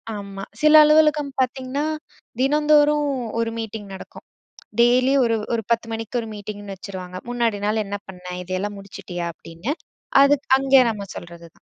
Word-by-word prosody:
ஆமா. 200 -1 -7 0.2
சில 305 0 +5
அலுவலகம் 300 -1 +4
பாத்தீங்கன்னா, 260 +3 -1 0.6
தினந்தோறும் 295 +1 +4 0.3
ஒரு 230 0 0
மீட்டிங் 220 -2 -6
நடக்கும். 190 - -11 0.6
டெய்லியும் 255 +3 +4
ஒரு 230 - +1 0.2
ஒரு 230 -1 0
10:00 230 0 +1
மணிக்கு 225 +2 -3
ஒரு 225 - -7
மீட்டிங்ன்னு 205 -1 -7
வச்சுருவாங்க. 185 -1 -8
"முன்னாடி 235 -3 0
நாள் 215 +1 +1
என்ன 200 +1 -4
பண்ண? 180 -1 -11 0.2
இதையெல்லாம் 190 +3 -3
முடிச்சிட்டியா?" 180 -3 -7
அப்டின்னு. 165 - -6 0.5
அது 280 +1 +6
க் - - -38
அங்கே 270 -1 +5
நம்ம 200 -2 -5
சொல்றது 170 0 -10
தான். - - -32
225 Hz, 150 wpm, -22 LUFS, 195-275 Hz, 0.6 s, அது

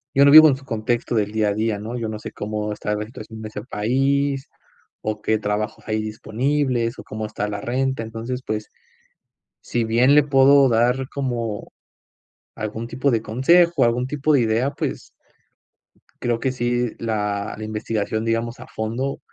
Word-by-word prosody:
yo 140 +1 +6
no 140 - +7
vivo 155 +1 +11
en 135 - +2
su 135 +1 -13
contexto 120 0 -1
del 105 -2 +1
día 110 -1 +1
a - - 0
día, 110 0 0
¿no? 115 +4 -5
Yo 115 -2 -3
no 110 - -4
sé - - -7
cómo 105 0 -4
está 105 0 -2
la 105 0 -3
situación 110 -1 -10
de 110 - -5
ese - - -6
país 135 +4 0 0.5
o 105 -1 -3
qué 110 0 +1
trabajos 105 +1 -3
hay 110 0 0
disponibles 120 +3 -1
o - - -8
cómo 110 0 -5
está 105 -1 -3
la 100 -1 -4
renta. 130 +1 -1
Entonces, 115 +3 -5
pues, 105 0 -3 0.9
si 120 -1 -1
bien 120 +5 +4
le 150 - +7
puedo 140 0 +5
dar 125 +3 +2
como 120 -6 -3 0.8
algún 110 +2 -5
tipo 130 +3 0
de 115 -3 +1
consejo, 165 +6 +4
algún 120 +2 +1
tipo 150 +2 0
de 140 - +5
idea, 115 +4 +1
pues, - - -5 1.1
creo 120 -1 0
que 130 - 0
sí, 120 -1 0
la 105 -2 -2
la 110 - -7
investigación, 110 0 -2
digamos 115 +1 -1
a - - -10
fondo, 120 +5 -3
115 Hz, 175 wpm, -22 LUFS, 110-130 Hz, 1.1 s, vivo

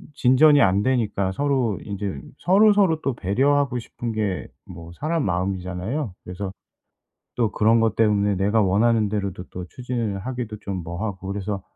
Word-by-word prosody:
진전이 145 +3 +5
안 100 +2 +3
되니까 105 -7 0
서로 130 -4 0
인제 100 -1 -4 0.2
서로서로 195 -3 +4
또 135 - -1
배려하고 130 +6 +1
싶은 115 0 -6
게 105 -4 -2 0.2
뭐 85 -1 -10
사람 160 +1 0
마음이잖아요. 95 - -2
그래서 95 +2 -6 0.8
또 115 -4 +1
그런 115 +2 +3
것 110 -1 +1
때문에 105 -2 +2
내가 105 +4 +2
원하는 105 +2 +2
대로도 100 -3 -3
또 90 -1 -7
추진을 120 -5 -3
하기도 120 -1 -5
좀 95 -3 -5
뭐 85 +4 -5
하고 95 -2 -5
그래서 100 0 -3
105 Hz, 325 characters per minute, -23 LUFS, 95-125 Hz, 0.8 s, 진전이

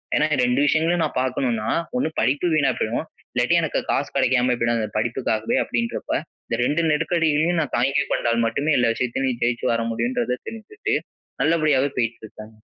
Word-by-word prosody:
ஏன்னா - - +3 0.2
2 125 +2 +1
விஷயங்களையும் 165 +3 +2
நான் - - -4
பார்க்கணும்னா 125 -4 -1 0.3
1 250 - 0
படிப்பு 140 +9 +1
வீணா 145 -3 +3
போயிடும். 120 +8 -2 0.3
இல்லாட்டி 120 +6 +2
எனக்கு 160 - -1
காசு 140 - 0
கிடைக்காம 130 -2 +3
போய்டும் 115 0 +1
அந்த 110 - -1
படிப்புக்காகவே 110 -1 0
அப்படின்றப்ப. 115 -1 -2 0.3
இந்த 115 - -2
2 160 +5 +1
நெருக்கடிகளையும் 165 +1 +1
நான் - - -2
தாங்கி 135 +4 +2
கொண்டால் 115 0 +1
மட்டுமே 145 +7 0
எல்லா 120 -2 +3
விஷயத்திலும் 130 +2 -1
நீ - - 0
ஜெயிச்சு 120 0 0
வர 115 0 0
முடியும்ன்றத 235 - -1
தெரிஞ்சுகிட்டு, 225 - -4 0.5
நல்லபடியாவே 155 -4 +2
போயிட்டு 115 -1 -1
இருக்கேங்க. 110 0 -12
130 Hz, 160 wpm, -23 LUFS, 115-155 Hz, 0.5 s, ஏன்னா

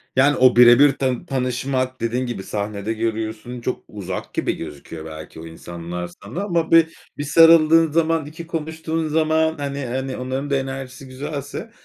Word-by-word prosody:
Yani, 140 +2 +4
o 130 -1 +5
bire 120 +1 +8
bir 145 -1 +7
ta 130 -2 -1
tanışmak 130 0 -2
Dediğin 120 +2 -1
gibi 120 -5 -5
sahnede 105 +1 -3
görüyorsun, 110 +2 -4
çok 125 - -3
uzak 95 -3 -6
gibi - - -1
gözüküyor 80 +2 -8
belki 80 0 -9
o 80 - -9
insanlar 85 +1 -7 0.2
sana 155 - -5
ama 170 -5 -1
bir 165 0 +5 0.2
bir 145 - -3
sarıldığın 165 +1 +6
zaman, 165 -1 +1
iki 160 +2 -9
konuştuğun 160 0 -3
zaman 160 +1 +2
hani 140 -1 -4
hani 130 +2 -3
onların 130 +3 -3
da 140 - +1
enerjisi 135 0 -5
güzelse 145 - -6
130 Hz, 160 wpm, -21 LUFS, 115-155 Hz, 0.2 s, bire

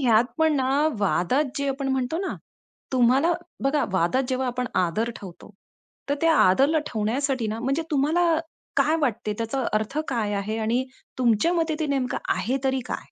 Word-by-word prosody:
ह्यात 235 -3 +4
पण 320 -1 +3
ना 260 0 +1 0.3
वादात 205 - +1
जे 280 0 -1
आपण 270 0 -2
म्हणतो 265 +5 -1
ना, 385 - -3 0.6
तुम्हाला 260 +7 +4 0.3
बघा 275 +1 +2
वादात 190 +8 +2
जेव्हा 260 0 -1
आपण 250 0 -2 0.2
आदर 215 +7 -1
ठेवतो 185 -1 -11 0.6
तर 285 - +2
त्या 330 -1 +4
आदरला 270 - +4
ठेवण्यासाठी 245 +3 -1
ना, 220 - -3
म्हणजे 275 +6 0
तुम्हाला 300 +5 +2 0.5
काय 300 +4 +3
वाटते? 220 -6 -1
त्याचा 230 +4 -2
अर्थ 215 +7 -1
काय 220 -5 -1
आहे? 205 +2 -2
आणि 230 +4 0 0.3
तुमच्या 245 +7 +3
मते 325 -2 0
ते 315 - 0
नेमकं 270 -3 -1 0.2
आहे 260 +3 -1
तरी 265 0 +1
काय? - - -2
260 Hz, 165 wpm, -25 LUFS, 225-285 Hz, 0.6 s, ह्यात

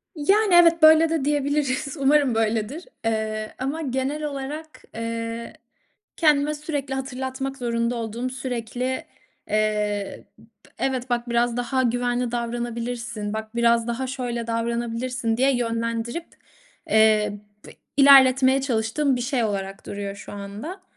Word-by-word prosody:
Yani, 390 +6 +3
evet, 335 -1 +6
böyle 315 +1 +7
de 320 -4 -1
diyebiliriz. 285 -1 0
Umarım 275 -3 +3
böyledir. 225 - -1 0.2
Eee, 215 -1 -2
ama 280 +5 -2
genel 270 +2 -2
olarak, 295 +2 -6
eee, 230 0 -4 0.6
kendime 300 -2 +3
sürekli 290 -3 -4
hatırlatmak 265 +1 -4
zorunda 235 -1 -1
olduğum, 230 +2 -3
sürekli, 255 0 -3 0.4
eee, 210 -1 -1
b 225 - -18 0.4
evet, 260 -1 -1
bak 240 0 -1
biraz 235 0 +1
daha 260 +2 0
güvenli 245 0 0
davranabilirsin, 235 -2 -3
bak 220 +1 -6
biraz 235 0 +3
daha 250 +2 -2
şöyle 245 -3 -4
davranabilirsin 235 +1 -2
diye 265 0 +3
yönlendirip, 230 +5 -2 0.6
eee, 215 -1 +4 0.3
bi - - -11 0.3
ilerletmeye 270 -1 +7
çalıştığım 260 +2 0
bir 245 - -3
şey 250 -2 0
olarak 195 -2 -3
duruyor 200 -1 -5
şu - - -10
anda. 210 - -7
245 Hz, 125 wpm, -24 LUFS, 230-275 Hz, 0.6 s, böyle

